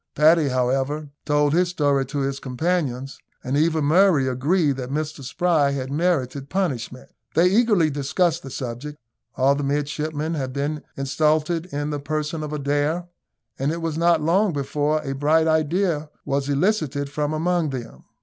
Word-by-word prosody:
Paddy, 155 Hz, +1 st, +5 dB
however, 135 Hz, +3 st, -1 dB
told 145 Hz, -1 st, +2 dB
his 175 Hz, +1 st, +3 dB
story 145 Hz, -6 st, +1 dB
to 140 Hz, +1 st, -3 dB
his 135 Hz, 0 st, -2 dB
companions, 135 Hz, -2 st, -2 dB, 0.2 s
and 130 Hz, +2 st, -2 dB
even 160 Hz, +1 st, +2 dB
Murray 160 Hz, -3 st, +4 dB
agreed 140 Hz, +3 st, +1 dB
that 125 Hz, -1 st, -5 dB
Mr 150 Hz, 0 st, -3 dB
Spry 150 Hz, 0 st, +1 dB
had 130 Hz, -1 st, -4 dB
merited 140 Hz, -4 st, 0 dB
punishment. 130 Hz, -9 st, -3 dB, 0.2 s
They 170 Hz, +3 st, +5 dB
eagerly 205 Hz, -7 st, +3 dB
discussed 160 Hz, +4 st, 0 dB
the 135 Hz, -, -9 dB
subject 130 Hz, +4 st, -6 dB, 0.4 s
all 135 Hz, +1 st, +3 dB
the 140 Hz, -, -2 dB
midshipmen 150 Hz, +2 st, -2 dB
had 130 Hz, -4 st, -3 dB
been 145 Hz, +2 st, -2 dB, 0.2 s
insulted 155 Hz, +4 st, +1 dB
in 145 Hz, -2 st, -3 dB
the 145 Hz, -, -2 dB
person 155 Hz, +2 st, -3 dB
of 150 Hz, -1 st, -5 dB
Adair, 150 Hz, +4 st, -1 dB, 0.5 s
and 135 Hz, +3 st, 0 dB
it 165 Hz, 0 st, -4 dB
was 165 Hz, -2 st, -2 dB
not 170 Hz, 0 st, +3 dB
long 185 Hz, +4 st, +2 dB
before 145 Hz, +2 st, -1 dB
a 135 Hz, -, -3 dB
bright 150 Hz, +4 st, +2 dB
idea 160 Hz, 0 st, +1 dB, 0.2 s
was 140 Hz, 0 st, -1 dB
elicited 145 Hz, -3 st, 0 dB
from 150 Hz, 0 st, -1 dB
among 165 Hz, 0 st, 0 dB
them. 125 Hz, -4 st, -7 dB
150 Hz, 160 wpm, -23 LUFS, 140-165 Hz, 0.5 s, Paddy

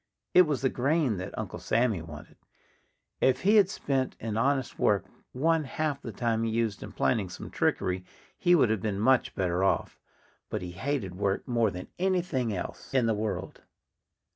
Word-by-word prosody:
It 180 Hz, -2 st, +7 dB
was 145 Hz, -3 st, -1 dB
the 130 Hz, -, +4 dB
grain 135 Hz, -, +1 dB
that 95 Hz, +2 st, -6 dB
Uncle 110 Hz, -4 st, -5 dB
Sammy 115 Hz, -6 st, +1 dB
wanted. 80 Hz, -1 st, -11 dB, 0.8 s
If 130 Hz, 0 st, +3 dB
he 210 Hz, +3 st, +5 dB
had 195 Hz, -3 st, +6 dB
spent 135 Hz, -8 st, -1 dB
in 110 Hz, -1 st, -3 dB
honest 130 Hz, +3 st, 0 dB
work -, -, +2 dB, 0.3 s
one 160 Hz, +4 st, +1 dB
half 145 Hz, 0 st, -2 dB
the 115 Hz, -, -6 dB
time 115 Hz, +1 st, 0 dB
he 115 Hz, -, 0 dB
used 110 Hz, -2 st, -1 dB
in 105 Hz, -, -7 dB
planning 105 Hz, -2 st, 0 dB
some 90 Hz, -, -8 dB
trickery 90 Hz, 0 st, 0 dB, 0.3 s
he 175 Hz, 0 st, +4 dB
would 125 Hz, -9 st, +4 dB
have 110 Hz, -3 st, 0 dB
been 105 Hz, -3 st, -2 dB
much 130 Hz, +4 st, +3 dB
better 90 Hz, -1 st, 0 dB
off. 95 Hz, -, 0 dB, 0.5 s
But -, -, -3 dB
he 90 Hz, -, -5 dB
hated 100 Hz, 0 st, -2 dB
work 100 Hz, +4 st, -1 dB
more 115 Hz, -3 st, +2 dB
than 90 Hz, -1 st, -7 dB
anything 175 Hz, -10 st, 0 dB
else 90 Hz, -4 st, -6 dB
in 130 Hz, -3 st, +4 dB
the 115 Hz, -, +2 dB
world. 105 Hz, 0 st, -4 dB
115 Hz, 180 wpm, -28 LUFS, 100-140 Hz, 0.8 s, It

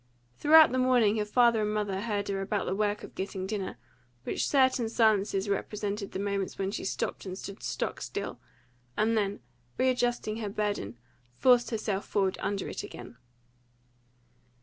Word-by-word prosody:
Throughout 315 Hz, -, +7 dB
the 255 Hz, -, 0 dB
morning 245 Hz, -4 st, +4 dB
her 210 Hz, -, 0 dB
father 235 Hz, +1 st, +4 dB
and 210 Hz, 0 st, 0 dB
mother 200 Hz, -2 st, -1 dB
heard 205 Hz, -2 st, -2 dB
her 195 Hz, -1 st, -1 dB
about 200 Hz, +1 st, -1 dB
the -, -, -1 dB
work 205 Hz, +1 st, 0 dB
of -, -, -10 dB
getting 190 Hz, 0 st, -4 dB
dinner, 195 Hz, -1 st, -4 dB, 0.5 s
with -, -, -2 dB
certain 260 Hz, -4 st, +3 dB
silences 205 Hz, -3 st, +2 dB
which 200 Hz, -, +2 dB
represented 205 Hz, 0 st, -4 dB
the -, -, -4 dB
moments 200 Hz, -1 st, -2 dB
when 195 Hz, 0 st, -1 dB
she -, -, -4 dB
stopped 195 Hz, -, -3 dB
and 185 Hz, 0 st, -5 dB
stood 200 Hz, 0 st, -8 dB
stock -, -, -3 dB
still, -, -, -5 dB, 0.6 s
and 220 Hz, +2 st, +2 dB
then, 205 Hz, -2 st, -1 dB, 0.4 s
readjusting 245 Hz, -4 st, +1 dB
her 215 Hz, -3 st, -3 dB
burden, 200 Hz, -, -2 dB, 0.4 s
forced 245 Hz, -2 st, +4 dB
herself 215 Hz, -4 st, -2 dB
forward 195 Hz, -2 st, 0 dB
under 200 Hz, -1 st, -2 dB
it -, -, -4 dB
again. -, -, -10 dB
210 Hz, 165 wpm, -29 LUFS, 195-230 Hz, 0.6 s, Throughout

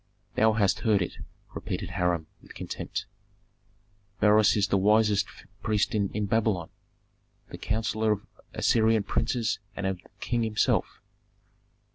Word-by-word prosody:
"Thou 110 Hz, 0 st, +4 dB
hast 100 Hz, -3 st, +2 dB
heard 105 Hz, -5 st, +2 dB
it!" -, -, -7 dB, 0.3 s
repeated -, -, -4 dB
Hiram, 90 Hz, -3 st, 0 dB, 0.2 s
with -, -, -15 dB
contempt. -, -, -5 dB, 1.1 s
"Beroes 105 Hz, 0 st, +5 dB
is 100 Hz, -1 st, +1 dB
the 100 Hz, -, +3 dB
wisest 105 Hz, +1 st, +3 dB, 0.3 s
priest 105 Hz, +1 st, 0 dB
in 105 Hz, 0 st, 0 dB
Babylon, 105 Hz, -5 st, 0 dB, 0.8 s
the -, -, -8 dB
counsellor 110 Hz, 0 st, 0 dB
of 100 Hz, -, -5 dB, 0.3 s
Assyrian 110 Hz, -2 st, +3 dB
princes 115 Hz, 0 st, 0 dB, 0.2 s
and 100 Hz, -, -4 dB
of 95 Hz, -1 st, -1 dB
the -, -, -22 dB
king 120 Hz, +2 st, -1 dB
himself." 110 Hz, -2 st, 0 dB
105 Hz, 125 wpm, -27 LUFS, 100-110 Hz, 1.1 s, Beroes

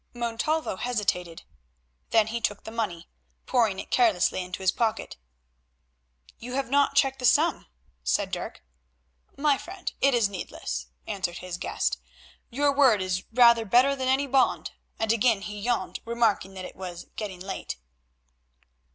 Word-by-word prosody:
Montalvo 240 Hz, +2 st, -1 dB
hesitated. 185 Hz, -8 st, -2 dB, 0.7 s
Then 220 Hz, -1 st, +4 dB
he 230 Hz, +2 st, -4 dB
took 205 Hz, -2 st, -1 dB
the 220 Hz, -, -8 dB
money, 210 Hz, -7 st, -3 dB, 0.4 s
pouring 225 Hz, -7 st, +2 dB
it -, -, -7 dB
carelessly 210 Hz, -7 st, +3 dB
into 180 Hz, +1 st, -6 dB
his 185 Hz, -, +4 dB
pocket. 225 Hz, -2 st, -1 dB, 1.2 s
"You 245 Hz, +2 st, -7 dB
have 270 Hz, -1 st, -2 dB
not 280 Hz, 0 st, +3 dB
checked 270 Hz, -1 st, +3 dB
the 250 Hz, -, -2 dB
sum," 310 Hz, +4 st, +3 dB, 0.4 s
said 60 Hz, 0 st, 0 dB
Dirk. -, -, -5 dB, 0.7 s
"My 280 Hz, -1 st, +2 dB
friend, 370 Hz, +1 st, -6 dB
it 275 Hz, -2 st, +4 dB
is 230 Hz, -4 st, +3 dB
needless," 120 Hz, -, -5 dB, 0.2 s
answered 180 Hz, -3 st, -3 dB
his 180 Hz, -1 st, -6 dB
guest, -, -, -1 dB, 0.5 s
"your 280 Hz, +3 st, +2 dB
word 260 Hz, -7 st, +5 dB
is 185 Hz, 0 st, -2 dB
rather 235 Hz, -1 st, +6 dB
better 250 Hz, +6 st, +4 dB
than 260 Hz, -1 st, -2 dB
any 265 Hz, +2 st, +3 dB
bond," 270 Hz, -1 st, +2 dB, 0.3 s
and 220 Hz, 0 st, +1 dB
again 230 Hz, -2 st, +3 dB
he 210 Hz, +1 st, -6 dB
yawned, 240 Hz, +3 st, -1 dB
remarking 230 Hz, -5 st, 0 dB
that 185 Hz, -1 st, -6 dB
it -, -, -10 dB
was 180 Hz, -2 st, -7 dB
getting 200 Hz, -4 st, -5 dB
late. 190 Hz, +1 st, -5 dB
225 Hz, 150 wpm, -27 LUFS, 190-260 Hz, 1.2 s, rather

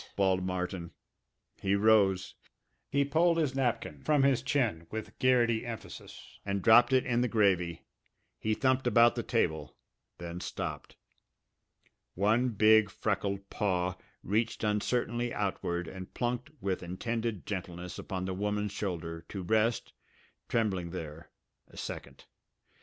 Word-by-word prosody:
bawled 95 Hz, -2 st, +2 dB
Martin. 90 Hz, -2 st, -3 dB, 0.7 s
He 95 Hz, 0 st, +2 dB
rose. 100 Hz, -3 st, +3 dB, 0.6 s
He 140 Hz, 0 st, +2 dB
pulled 165 Hz, +4 st, +3 dB
his 150 Hz, -5 st, +1 dB
napkin 120 Hz, -, -1 dB
from 150 Hz, -3 st, +3 dB
his 135 Hz, -3 st, +3 dB
chin 120 Hz, -, 0 dB
with 110 Hz, 0 st, -7 dB
Garrity 120 Hz, -3 st, +3 dB
emphasis 115 Hz, -3 st, -9 dB
and 100 Hz, -1 st, -2 dB
dropped 120 Hz, +2 st, +7 dB
it 130 Hz, -1 st, +3 dB
in 120 Hz, -1 st, +1 dB
the 125 Hz, -, +2 dB
gravy. 95 Hz, -7 st, +1 dB, 0.6 s
He 110 Hz, 0 st, 0 dB
thumped 130 Hz, 0 st, +1 dB
about 120 Hz, 0 st, +6 dB
the -, -, -2 dB
table, 80 Hz, 0 st, -1 dB, 0.4 s
then 85 Hz, 0 st, -6 dB
stopped. -, -, -5 dB, 1.2 s
One 110 Hz, +6 st, +2 dB
big 110 Hz, -1 st, +5 dB
freckled 100 Hz, -1 st, -2 dB
paw 90 Hz, -2 st, 0 dB, 0.3 s
reached 110 Hz, +5 st, -1 dB
uncertainly 120 Hz, +3 st, 0 dB
outward 90 Hz, -4 st, -2 dB
and 95 Hz, +2 st, -8 dB
plunked 125 Hz, +4 st, -2 dB
with 95 Hz, -2 st, -2 dB
intended 110 Hz, +3 st, -3 dB
gentleness 90 Hz, -2 st, -5 dB
upon 95 Hz, -2 st, -4 dB
the 95 Hz, -, -2 dB
woman's 105 Hz, +1 st, -1 dB
shoulder, 85 Hz, -5 st, -4 dB
to 95 Hz, -2 st, -5 dB
rest, 110 Hz, +5 st, +1 dB, 0.6 s
trembling 95 Hz, -7 st, 0 dB
there, 80 Hz, -2 st, -7 dB, 0.4 s
a -, -, -17 dB
second. -, -, -7 dB
105 Hz, 130 wpm, -31 LUFS, 90-120 Hz, 1.2 s, dropped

